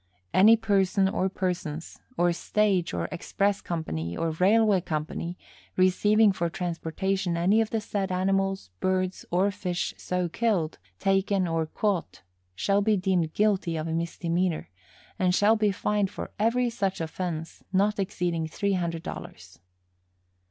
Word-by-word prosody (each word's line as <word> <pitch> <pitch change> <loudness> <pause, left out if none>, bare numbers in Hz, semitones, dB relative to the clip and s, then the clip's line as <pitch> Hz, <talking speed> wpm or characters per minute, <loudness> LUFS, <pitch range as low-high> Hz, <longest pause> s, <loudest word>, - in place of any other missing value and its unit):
Any 210 +5 +7
person 195 -3 +2
or 190 0 0
persons, 175 -4 -4 0.2
or 175 0 +3
stage 195 -1 +1
or - - -2
express 200 +3 0
company 85 - -3
or 165 -1 0
railway 200 +3 +4
company, 170 +1 -4 0.4
receiving 205 +3 +4
for 170 -3 -1
transportation 175 +1 -2
any 195 +6 +4
of 220 - -1
the 225 - 0
said 200 -3 -3
animals, 195 - 0
birds 185 0 -1
or 190 +3 +2
fish 180 -2 -3
so 180 -1 -1
killed, 180 -4 0 0.2
taken 195 - +1
or 165 -1 0
caught 190 - -2 0.3
shall 200 - +2
be 210 0 +3
deemed 180 -4 0
guilty 195 -6 +1
of 155 +1 -3
a 160 - -2
misdemeanor, 170 - -1 0.5
and 180 -1 +3
shall 210 +3 +5
be 210 -2 +2
fined 205 +1 0
for - - -7
every 235 +3 +2
such 195 -4 -1
offense 165 0 -4
not 200 +2 +2
exceeding 175 -4 -1
three 200 +5 -1
hundred 170 -3 -2
dollars. - - -9
185 Hz, 140 wpm, -27 LUFS, 170-200 Hz, 0.5 s, Any